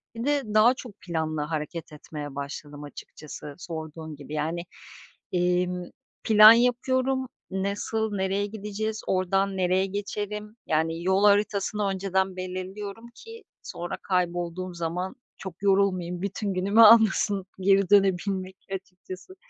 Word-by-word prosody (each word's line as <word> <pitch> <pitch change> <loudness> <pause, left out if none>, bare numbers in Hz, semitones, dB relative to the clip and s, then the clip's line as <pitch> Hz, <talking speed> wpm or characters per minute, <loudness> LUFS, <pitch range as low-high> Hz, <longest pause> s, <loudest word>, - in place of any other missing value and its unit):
Bir 230 +3 -4
de 290 -1 +2
daha 220 +4 +6
çok 245 -4 -10
planlı 160 -3 -2
hareket 155 +1 -4
etmeye 150 -2 -8
başladım 145 +1 -7
açıkçası 145 0 -10
sorduğun 160 -2 -7
gibi, 145 +1 -10
yani, 160 +3 -2 0.7
emm, 180 0 +1 0.4
plan 215 0 +9
yapıyorum. 260 +2 +1 0.2
Nasıl, 205 +3 -2
nereye 195 +1 0
gideceğiz, 215 +1 -4
ordan 195 +1 +1
nereye 185 +1 +2
geçerim, 210 +2 -5
yani, 160 +2 0
yol 190 +2 +2
haritasını 205 0 +2
önceden 190 -1 -1
belirliyorum 190 +4 -6
ki 455 0 -12 0.2
sonra 175 +1 -5
kaybolduğum 180 0 -2
zaman 170 +3 -3 0.2
çok 190 0 -9
yorulmayayım. 185 -3 +1
Bütün 200 0 -2
günümü 200 +5 +3
almasın 210 -3 +6 0.2
geri 195 0 +3
dönebilmek 190 -1 +2
açıkçası. 185 - -8
190 Hz, 115 wpm, -26 LUFS, 175-205 Hz, 0.7 s, plan